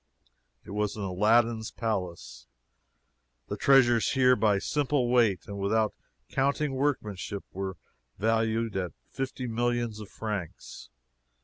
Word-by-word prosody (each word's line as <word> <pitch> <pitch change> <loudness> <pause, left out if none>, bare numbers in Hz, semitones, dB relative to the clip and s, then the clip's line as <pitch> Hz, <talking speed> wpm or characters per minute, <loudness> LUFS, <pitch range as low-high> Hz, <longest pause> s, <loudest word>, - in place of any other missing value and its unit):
It - - -10
was 105 0 -1
an 105 - -5
Aladdin's 110 +4 +2
palace. 95 - -4 1.0
The - - -2
treasures 120 -4 +4
here, 125 -1 +5
by 105 -2 +3
simple 140 +2 0
weight, 110 -8 +3
without 100 +2 0 0.3
counting 140 +1 0
workmanship, 105 -8 -2
were 95 -1 -4 0.4
valued 115 +1 +1
at 90 -3 -2 0.2
fifty 130 -1 -4
millions 120 -1 -1
of 105 -2 -9
francs! 105 - -6
110 Hz, 110 wpm, -28 LUFS, 100-120 Hz, 1.0 s, here